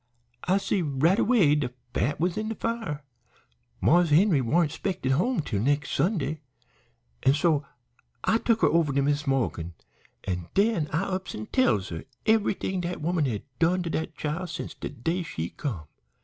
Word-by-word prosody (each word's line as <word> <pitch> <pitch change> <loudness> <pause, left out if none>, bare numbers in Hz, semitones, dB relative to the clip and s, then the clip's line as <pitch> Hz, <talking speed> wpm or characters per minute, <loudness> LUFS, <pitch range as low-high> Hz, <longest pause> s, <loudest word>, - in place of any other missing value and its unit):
"I 185 +2 +3
see 195 -1 0
right 160 +6 +2
away 205 -12 +4
de 145 -4 0 0.2
fat 145 +4 0
was 175 +2 +1
in 215 0 -2
de 225 - -3
fire. 225 -13 -3 0.8
Marse 175 +1 +4
Henry 160 -1 +4
warn't 150 +6 +2
'spected 160 -5 -2
home 215 - +2
till 110 -9 -2
de 110 - -1
nex' 145 +1 +1
Sunday, 155 -6 0 0.8
an' 135 - +4
so 155 -3 +1 0.6
I 225 - +3
tuk 230 -1 +1
her - - +6
over 165 -3 +2
to 140 0 +2
Mis' 145 +1 0
Morgan, 100 -11 -1 0.5
an' 90 -3 -3
den 200 -6 +2
I 160 +5 +1
ups 190 -1 -3
an' 110 - -5
tells 110 -7 +2
her 80 -1 -6 0.2
everything 205 -4 +1
dat 175 +1 -3
woman 165 0 0
had 110 -6 -2 0.2
done 175 +2 +2
to 170 - -3
dat 160 -1 -3
chile 160 +5 -3
since 170 0 -6
de - - -6
day 165 +10 -2
she 85 - -4
come. 105 - -4
160 Hz, 175 wpm, -27 LUFS, 135-185 Hz, 0.8 s, her